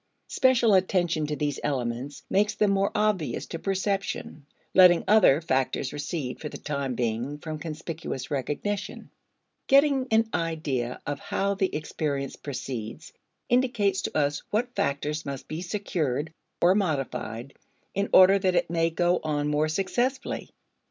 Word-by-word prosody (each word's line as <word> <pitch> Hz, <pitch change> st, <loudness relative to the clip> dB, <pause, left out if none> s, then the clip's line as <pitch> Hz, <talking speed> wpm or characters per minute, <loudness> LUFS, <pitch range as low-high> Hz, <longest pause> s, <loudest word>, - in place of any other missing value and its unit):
Special 245 Hz, -4 st, +4 dB
attention 175 Hz, -4 st, +2 dB
to 150 Hz, -, -2 dB
these 145 Hz, -1 st, -2 dB
elements 130 Hz, 0 st, -3 dB
makes 210 Hz, +2 st, +1 dB
them 210 Hz, -2 st, +2 dB
more 195 Hz, 0 st, +2 dB
obvious 205 Hz, -, 0 dB
to 165 Hz, -, -6 dB
perception 195 Hz, -6 st, -2 dB, 0.3 s
(letting 180 Hz, -2 st, +7 dB
other 200 Hz, -9 st, +6 dB
factors 130 Hz, -3 st, -1 dB
recede 145 Hz, -3 st, -4 dB
for 150 Hz, -, -4 dB
the -, -, -8 dB
time 140 Hz, -4 st, -3 dB
being 120 Hz, +4 st, -2 dB
from 155 Hz, 0 st, -6 dB
conspicuous 160 Hz, -4 st, -6 dB
recognition). 150 Hz, +9 st, -3 dB, 0.6 s
Getting 275 Hz, -1 st, +4 dB
an 225 Hz, 0 st, +3 dB
idea 145 Hz, -7 st, -2 dB
of 145 Hz, -1 st, -3 dB
how 200 Hz, +1 st, -1 dB
the 195 Hz, -1 st, -1 dB
experience 145 Hz, -2 st, -3 dB
proceeds 125 Hz, -5 st, -6 dB, 0.3 s
indicates 235 Hz, -6 st, +2 dB
to -, -, -3 dB
us 145 Hz, -1 st, +1 dB
what 245 Hz, +4 st, -1 dB
factors 150 Hz, +2 st, -1 dB
must 140 Hz, -2 st, -6 dB
be 155 Hz, +2 st, -5 dB
secured 160 Hz, -, -2 dB, 0.3 s
or 175 Hz, +2 st, +5 dB
modified 135 Hz, -, -2 dB, 0.4 s
in 200 Hz, +1 st, -1 dB
order 190 Hz, +1 st, +7 dB
that 185 Hz, -2 st, +1 dB
it 175 Hz, -, +1 dB
may 165 Hz, -1 st, +2 dB
go 175 Hz, +2 st, +1 dB
on 150 Hz, -1 st, -1 dB
more 150 Hz, +1 st, +2 dB
successfully. 220 Hz, -, -1 dB
160 Hz, 140 wpm, -26 LUFS, 145-195 Hz, 0.6 s, letting